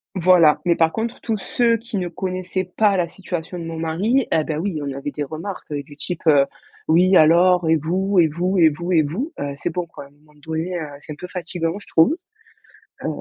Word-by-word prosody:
voilà, 175 -4 +5
mais 170 -1 +3
par 165 -1 +3
contre 230 +4 -4
tous 225 -2 -1
ceux 235 +1 +1
qui 230 -1 -6
ne 180 - -2
connaissaient 185 +1 -3
pas 200 +2 +1
la 175 -2 +1
situation 175 -1 -6
de - - -6
mon 165 0 -6
mari, 195 +11 0
eh 160 - +3
beh, 150 0 -3
oui, 165 -2 -2
on 140 -1 -3
avait 140 +1 -4
des 150 - -3
remarques, 160 +7 -7
heu, 145 -1 -3
du 145 0 -14
type, 175 +2 -5
heu: 145 -3 +6 0.4
«Oui, 180 +4 +4
alors 175 +1 +5
et 160 - +5
vous 185 +6 -1
et 165 - +6
vous 180 +5 -1
et 165 -3 +6
vous 170 +4 -5
et 165 -3 +4
vous?» 205 - -3
Heu, 145 0 -3
c'est 145 - -3
bon 175 +1 -3
quoi, 165 -4 -11
à - - -15
un - - -22
moment 150 +1 -26
donné, 160 +3 -3
heu, 175 - -3 0.2
c'est 150 - -7
un - - -10
peu 180 - -8
fatigant, 170 -1 -3
je 205 - -12
trouve, 165 - +4 0.9
heu - - -2
175 Hz, 235 wpm, -21 LUFS, 160-185 Hz, 0.9 s, heu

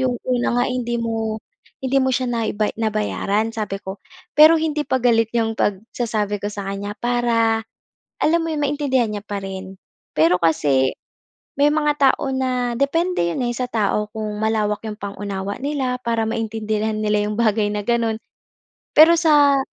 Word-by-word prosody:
yung 255 -2 0
una 250 -1 +1
nga, - - +3
eh, 255 - -2
hindi 240 -1 -2
mo 225 -1 -2 0.4
hindi 270 +1 +1
mo 260 - +1
siya 255 0 0
naiba 220 -2 -1
nabayaran, 215 0 -1
sabi 205 -3 -3
ko. 190 0 -9 0.3
Pero 310 +2 +8
hindi 310 -1 -1
pa 260 -3 0
galit 230 -2 +2
yung 225 -1 +1
pagsasabi 210 0 -2
ko 205 - -2
sa 200 -1 -6
kanya 200 +1 -4
para, 230 -2 +1 0.6
alam 335 +2 +3
mo 330 - -3
yun, 310 - -2
maintindihan 280 -4 +1
niya 205 -1 -5
pa 205 -1 -3
rin. 190 0 -7 0.4
Pero 165 +3 +4
kasi, 145 -5 +2 0.6
may 285 +1 +5
mga 300 -1 +2
tao 270 0 +3
na 250 -2 -1
depende 330 - +1
'yon, 210 +9 -2
eh, - - 0
sa 250 - -1
tao 210 -2 0
kung 215 -1 -4
malawak 210 -1 0
yung 215 - -4
pang-unawa 200 0 -5
nila 275 -3 -1
para 230 -2 0
maintindihan 220 -1 -2
nila 210 -1 +1
yung 210 - -3
bagay 215 -2 +2
na 210 - -2
ganon. 230 -2 +1 0.8
Pero 320 +2 +9
sa, 290 -4 +5
225 Hz, 165 wpm, -21 LUFS, 210-260 Hz, 0.8 s, Pero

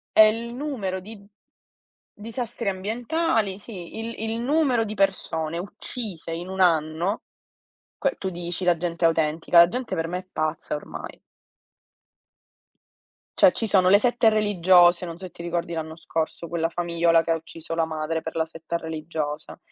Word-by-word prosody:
È - - +7
il 225 +2 +5
numero 240 -9 -3
di 215 +4 -10
d 200 0 -17 0.9
disastri 225 -1 -4
ambientali, 225 - -1
sì, 200 -4 -9
il 230 +1 -5
il 225 +1 -2
numero 265 -2 +2
di 215 -1 -4
persone 170 -5 0
uccise 190 -1 -5
in 170 +2 -4
un 190 0 -6
anno, 165 +3 +2 0.8
che 275 - 0
tu 190 - -3
dici: 175 0 -4
"La 175 -2 +3
gente 170 0 -2
è - - +8
autentica". 165 +1 +2
La 170 0 +9
gente 250 +5 -3
per 165 0 -2
me, 180 +2 -2
è 185 - -18
pazza 155 -1 -2
ormai. 150 - -8 2.2
Cioè, 295 - +7
ci 225 - -1
sono 190 -3 +4
le 200 +2 +7
sette 240 0 +3
religiose 180 -4 +4
non 165 -1 -6
so 190 - -11
se - - -10
ti 170 - -10
ricordi 170 0 -2
l'anno 160 -1 -4
scorso, 165 0 -3
quella 165 0 0
famigliola 170 -1 +2
che - - -3
ucciso 165 0 -5
la 165 -1 +1
madre, 160 +1 -2
per 160 +1 -7
la 160 - +2
setta 165 +1 -5
religiosa 155 -2 -5
175 Hz, 165 wpm, -25 LUFS, 165-215 Hz, 2.2 s, La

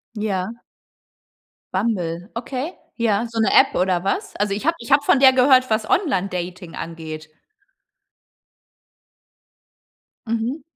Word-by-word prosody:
Ja. 210 -1 -2 1.2
Bumble, 185 -3 -2
okay. 260 +7 -4 0.2
Ja. 230 -2 +1
So 230 0 -4
'ne 220 - +3
App 270 - +5
oder 180 -1 +1
was? 400 - -2
Also 205 -1 0
ich 210 +6 -4
habe 330 +1 +2
ich - - -9
habe 280 +1 +6
von 285 - +4
der 265 -1 +7
gehört, 255 0 +5
was 220 0 0
Online-Dating 180 - -1
angeht. 160 -2 -7 3.0
Mhm. 230 +6 -2
220 Hz, 115 wpm, -21 LUFS, 180-255 Hz, 3.0 s, der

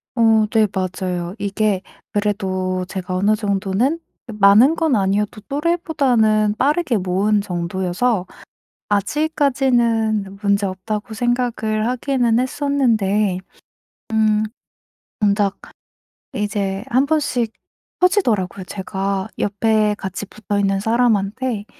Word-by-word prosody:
어. 225 -2 +4
네 220 -2 +4
맞아요. 185 -1 -3
이게 200 -1 0 0.3
그래도 185 -3 -1
제가 185 -1 -4
어느 205 +3 +3
정도는 205 - 0 0.3
많은 215 +7 +5
건 320 -6 +1
아니어도 205 +2 0
또래보다는 275 -10 +1
빠르게 290 -3 +1
모은 195 +3 +1
정도여서 185 +3 -1 0.6
'아직까지는 230 -4 +1
문제없다.'고 200 +2 -1
생각을 230 -2 0
하기는 245 -2 +1
했었는데 225 -8 +1 0.7
음 215 -1 +3 0.8
정작 200 -1 +1 0.8
이제 200 -1 -2
1 260 +3 +3
번씩 275 -7 0 0.5
터지더라고요. 225 - +1
제가 195 +1 -3
옆에 210 +1 +1
같이 190 +1 -5
붙어있는 200 -2 -1
사람한테 225 0 0
210 Hz, 235 characters per minute, -20 LUFS, 195-240 Hz, 0.8 s, 많은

